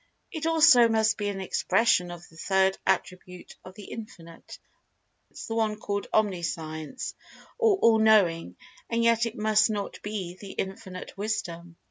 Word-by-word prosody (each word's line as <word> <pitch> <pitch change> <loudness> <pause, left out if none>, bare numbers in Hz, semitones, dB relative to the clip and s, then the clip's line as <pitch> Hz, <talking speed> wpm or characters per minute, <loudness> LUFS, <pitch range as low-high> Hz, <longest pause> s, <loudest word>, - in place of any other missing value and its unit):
It 320 -2 -3
also 315 -7 +6
must 220 -2 +2
be 205 - -1
an 195 -1 -4
expression 190 -1 +1
of 175 0 -10
the 160 - -20
third 190 +2 +1
attribute 180 0 -3
of 185 0 -12
The 210 - -11
Infinite—the 190 +2 -12
one 220 -2 0
called 200 -1 -3
Omniscience, 170 - -2 0.5
or 445 -5 +4
All 230 - +4
Knowing—and 210 - +1
yet 230 0 +3
it 230 - -7
must 215 +1 +3
not 205 -2 -4
be 190 -4 -5
The 200 -2 -9
Infinite 190 -1 -6
Wisdom. 175 -5 -4
205 Hz, 135 wpm, -27 LUFS, 180-225 Hz, 0.5 s, also